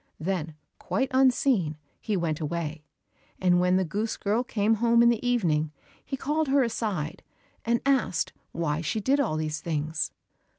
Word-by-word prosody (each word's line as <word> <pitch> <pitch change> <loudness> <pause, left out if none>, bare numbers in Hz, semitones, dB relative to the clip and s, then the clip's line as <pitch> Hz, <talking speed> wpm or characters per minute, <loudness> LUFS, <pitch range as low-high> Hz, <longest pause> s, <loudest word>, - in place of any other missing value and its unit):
Then, 160 -2 -2 0.2
quite 265 -1 -1
unseen, 255 - +3 0.2
he 210 -3 -1
went 160 -3 -1
away, 155 -1 -3 0.6
and 180 -1 +4
when 180 +1 +3
the 190 0 +2
goose 210 +7 -2
girl 215 +4 0
came 215 -2 +1
home 235 0 +5
in 235 - +6
the 235 -1 0
evening, 165 -11 +1 0.3
he 270 - -4
called 300 +3 0
her 275 0 +4
aside, 210 -9 -2 0.4
and 235 +1 +2
asked 265 -11 +1 0.2
why 160 -2 -1
she 170 +7 -1
did 270 +7 +2
all 230 - +1
these 155 -1 -2
things. 155 -1 -2
195 Hz, 160 wpm, -27 LUFS, 160-240 Hz, 0.6 s, in